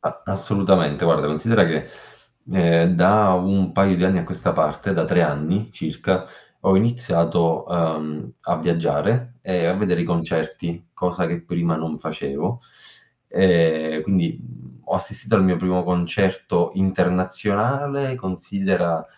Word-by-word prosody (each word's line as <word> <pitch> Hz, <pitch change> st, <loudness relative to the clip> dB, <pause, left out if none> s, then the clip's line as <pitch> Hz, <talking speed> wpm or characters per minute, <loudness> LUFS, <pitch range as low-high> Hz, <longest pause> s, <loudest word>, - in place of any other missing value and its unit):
A -, -, -5 dB
assolutamente, 95 Hz, -6 st, +1 dB
guarda, 80 Hz, -3 st, +3 dB
considera 90 Hz, +8 st, +3 dB
che, 80 Hz, -2 st, -2 dB, 0.7 s
ehm, 85 Hz, -1 st, +4 dB
da 105 Hz, +2 st, +5 dB
un 95 Hz, 0 st, +1 dB
paio 95 Hz, -1 st, +3 dB
di 90 Hz, -, +2 dB
anni 95 Hz, -1 st, +3 dB
a -, -, -3 dB
questa -, -, -2 dB
parte, -, -, 0 dB
da -, -, +1 dB
3 90 Hz, -, +3 dB
anni, 80 Hz, +8 st, -1 dB
circa, 95 Hz, +3 st, -2 dB, 0.4 s
ho 95 Hz, -, +3 dB
iniziato, 85 Hz, -7 st, +1 dB
ehm, 75 Hz, -3 st, -3 dB
a -, -, -1 dB
viaggiare 85 Hz, +9 st, 0 dB
e 90 Hz, -3 st, 0 dB
a 90 Hz, -, +1 dB
vedere 95 Hz, -3 st, 0 dB
i -, -, -1 dB
concerti, 85 Hz, 0 st, -3 dB
cosa 90 Hz, -1 st, -1 dB
che 85 Hz, +1 st, -4 dB
prima 85 Hz, -1 st, -1 dB
non 80 Hz, -1 st, -5 dB
facevo. 115 Hz, -, -4 dB, 0.7 s
Ehm, 80 Hz, -4 st, +2 dB
quindi, 90 Hz, 0 st, 0 dB
mhmm, 65 Hz, 0 st, -16 dB
ho -, -, -2 dB
assistito 110 Hz, -, -3 dB
al 95 Hz, -, +5 dB
mio 90 Hz, -1 st, +3 dB
primo 90 Hz, +1 st, 0 dB
concerto 90 Hz, 0 st, 0 dB
internazionale 100 Hz, +9 st, 0 dB
considera, 95 Hz, -, -2 dB
90 Hz, 140 wpm, -21 LUFS, 85-95 Hz, 0.7 s, da